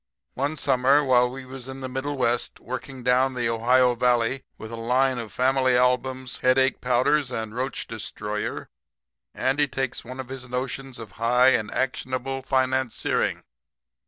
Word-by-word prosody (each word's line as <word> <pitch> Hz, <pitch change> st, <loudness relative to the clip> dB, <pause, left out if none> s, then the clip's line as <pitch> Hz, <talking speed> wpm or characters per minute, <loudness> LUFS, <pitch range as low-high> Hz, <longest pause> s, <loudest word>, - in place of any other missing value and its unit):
"One 145 Hz, +4 st, -2 dB
summer 135 Hz, +3 st, +3 dB
while 125 Hz, -2 st, +4 dB
we 130 Hz, +1 st, -8 dB
was 130 Hz, -1 st, -9 dB
in 135 Hz, 0 st, -7 dB
the 130 Hz, -, -3 dB
middle 135 Hz, +2 st, -3 dB
West, 120 Hz, -1 st, 0 dB
working 130 Hz, +1 st, -7 dB
down 130 Hz, +1 st, +3 dB
the 120 Hz, -2 st, 0 dB
Ohio 125 Hz, +2 st, +3 dB
valley 120 Hz, +1 st, +1 dB, 0.2 s
with 110 Hz, -, -9 dB
a -, -, -4 dB
line 125 Hz, +3 st, +1 dB
of 115 Hz, -2 st, -7 dB
family 130 Hz, 0 st, +2 dB
albums, 125 Hz, +1 st, 0 dB
headache 130 Hz, 0 st, +3 dB
powders 130 Hz, +3 st, +2 dB
and 110 Hz, -3 st, -4 dB
roach 130 Hz, +3 st, -3 dB
destroyer, 105 Hz, -1 st, -4 dB, 0.7 s
Andy 140 Hz, +3 st, +1 dB
takes 130 Hz, -1 st, -3 dB
one 130 Hz, +2 st, -9 dB
of 130 Hz, -1 st, -6 dB
his 130 Hz, -1 st, -7 dB
notions 130 Hz, +1 st, -4 dB
of 115 Hz, -2 st, -9 dB
high 125 Hz, +2 st, +5 dB
and 110 Hz, -5 st, +1 dB
actionable 130 Hz, 0 st, -2 dB
financiering. 130 Hz, -2 st, 0 dB
130 Hz, 155 wpm, -25 LUFS, 125-130 Hz, 0.7 s, high